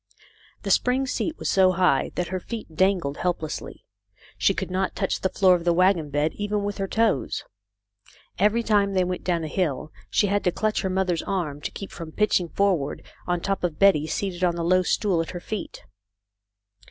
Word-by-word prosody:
The - - -1
spring 255 +2 +2
seat 310 +4 -2
was - - -4
so 185 -1 +4
high 175 -7 +2
that 180 - -2
her 185 +1 -2
feet 215 -4 -7
dangled 180 -5 +1
helplessly. 170 -4 -4 0.5
She - - +2
could - - -4
not 185 +1 -1
touch - - -1
the 190 - +1
floor 185 -1 +4
of 175 -1 0
the 170 0 +2
wagon 180 -4 +3
bed 145 +2 0
even 205 0 -2
with 205 0 -3
her 195 - -1
toes. 215 - 0 1.0
Every 210 +4 +3
time 200 -3 +2
they 185 - +3
went 180 0 -3
down 170 -2 0
a - - -3
hill 155 -3 -2 0.2
she - - +2
had 205 +1 0
to 180 - +3
clutch 215 +4 0
her 190 - -1
mother's 185 -3 0
arm 155 -7 -3
to - - -3
keep 195 - -8
from 165 -2 -8
pitching 195 -5 +1
forward 180 -8 0 0.2
on 175 -1 0
top 195 0 -2
of 170 -4 -1
Betty, 185 -6 +4
seated 185 +2 -3
on 175 -1 +2
the 170 - -3
low 185 +2 +4
stool 185 -1 +1
at 165 - -5
her - - -5
feet. 210 +2 -6
185 Hz, 200 wpm, -25 LUFS, 170-200 Hz, 1.0 s, so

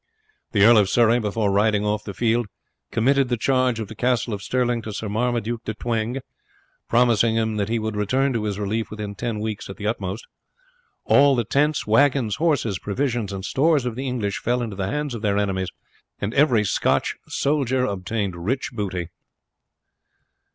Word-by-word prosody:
The 100 -2 +3
Earl 115 -1 +7
of 100 -2 +2
Surrey, 120 +2 +4
before 105 -2 0
riding 105 +1 +2
off 105 0 -1
the 100 - -7
field, 120 -1 +1 0.4
committed 135 +3 +2
the 120 - 0
charge 130 -1 +1
of 110 - -4
the - - -9
Castle 120 -1 0
of 100 - -4
Stirling 120 -1 0
to 110 - -6
Sir 110 - -4
Marmaduke 115 +1 -1
de 110 - -4
Twenge, 115 +3 -2 0.7
promising 115 -2 +3
him 110 -1 0
that 100 0 -1
he 115 - +1
would 110 -1 -3
return 130 +7 +1
to 110 -3 -1
his 100 -2 -2
relief 105 +2 -2
within 105 -1 -6
ten 115 +1 -3
weeks 105 -2 -4
at 95 - -8
the 105 - -6
utmost. 105 -1 -3 0.8
All 140 0 +5
the 120 - +1
tents, 145 +7 +1
wagons, 125 -1 +3
horses, 135 - +1
provisions, 120 -1 -2
and 95 0 -5
stores 145 -1 +2
of 125 - -2
the 135 +2 -4
English 110 -6 -2
fell 120 +1 0
into 110 -4 -5
the 95 0 -2
hands 150 +2 -2
of 115 - -5
their 100 -2 +1
enemies, 95 -2 -1 0.5
and 100 +3 -3
every 130 -6 +4
Scotch 100 - +1
soldier 130 -3 0
obtained 100 -1 -2
rich 110 +11 -2
booty. 95 -6 -3
115 Hz, 180 wpm, -23 LUFS, 105-125 Hz, 0.8 s, Earl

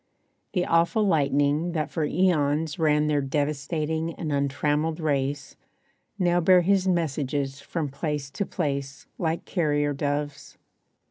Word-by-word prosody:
The 180 -2 +1
awful 170 +6 +2
lightning 145 0 +2
that 155 -2 -2
for 160 - -1
eons 155 -3 +1
ran 150 -1 +3
Their 150 -1 +1
devastating 150 +3 -2
and 155 -3 -4
untrammeled 145 +3 0
race, 140 -2 -1 0.6
Now 175 -2 +2
bear 180 +1 +6
his 190 +1 +2
messages 145 -5 -1
from 155 +2 -3
place 140 0 -4
to 170 - -2
place 140 -4 -3
Like 165 0 -1
carrier 145 -4 0
doves. 145 0 -3
150 Hz, 125 wpm, -26 LUFS, 145-165 Hz, 0.6 s, bear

